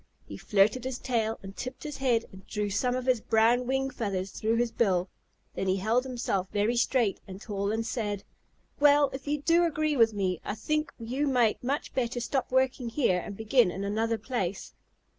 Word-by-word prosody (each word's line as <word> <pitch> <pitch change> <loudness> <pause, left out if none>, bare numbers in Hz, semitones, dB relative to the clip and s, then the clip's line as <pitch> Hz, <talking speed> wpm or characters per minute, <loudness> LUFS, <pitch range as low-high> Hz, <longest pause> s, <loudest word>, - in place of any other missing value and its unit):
He - - -7
flirted 210 +5 +2
his 260 -1 -3
tail 225 -4 -1
and 195 0 -9
tipped 255 +1 -6
his 295 -2 -5
head 245 -4 +1
and 190 0 -14
drew 210 -1 -2
some 250 +5 +1
of 255 -1 -3
his 255 -4 +2
brown 230 +3 +3
wing 270 +1 0
feathers 195 -6 -3
through 220 +1 0
his 235 0 +1
bill. 185 -6 +1 0.4
Then 195 - -3
he 185 - +3
held 220 +6 +1
himself 235 -7 -2
very 210 +4 +1
straight 235 -3 +1
and 190 0 -8
tall, 200 -1 -2
and 225 +1 -1
said, 210 -4 -3 0.6
"Well, 290 -1 +5
if 265 +1 -7
you 290 0 -1
do 340 +2 +4
agree 310 -2 +1
with 225 -4 +4
me, 185 -3 -1
I 205 - -3
think 305 +6 -1
you 255 +5 -2
might 245 -5 +2
much 275 +4 -2
better 245 -1 -1
stop 255 +3 -2
working 260 -1 +1
here 225 -8 +2
and 200 +2 -7
begin 220 0 +3
in 195 +2 -5
another 225 +3 0
place." 205 -5 -3
230 Hz, 200 wpm, -28 LUFS, 205-260 Hz, 0.6 s, Well